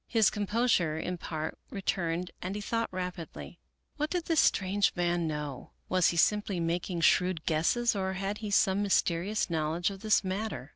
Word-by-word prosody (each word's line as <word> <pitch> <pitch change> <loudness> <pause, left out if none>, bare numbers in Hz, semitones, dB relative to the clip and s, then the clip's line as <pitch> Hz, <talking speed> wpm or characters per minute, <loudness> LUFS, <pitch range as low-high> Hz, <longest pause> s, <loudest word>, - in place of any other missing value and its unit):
His 225 -4 +3
composure 205 -6 +1
in 180 +2 -3
part 155 -1 -5
returned 180 -3 -2
and 185 +2 -4
he 210 - -4
thought 230 +2 -2
rapidly. 180 -2 -6 0.4
What 300 +1 -1
did 355 -2 -2
this 330 -3 +2
strange 195 +1 +3
man 175 -1 0
know? 150 -3 -5 0.2
Was 185 -1 +3
he 170 - 0
simply 205 +1 +2
making 170 +1 -2
shrewd 180 0 +3
guesses, 190 +10 +2
or 190 -1 -1
had 195 +2 -3
he 215 -1 -4
some 195 0 +3
mysterious 195 0 +1
knowledge 165 +3 0
of 195 - -8
this 215 -1 +3
matter? 190 - -4
185 Hz, 165 wpm, -30 LUFS, 170-205 Hz, 0.4 s, His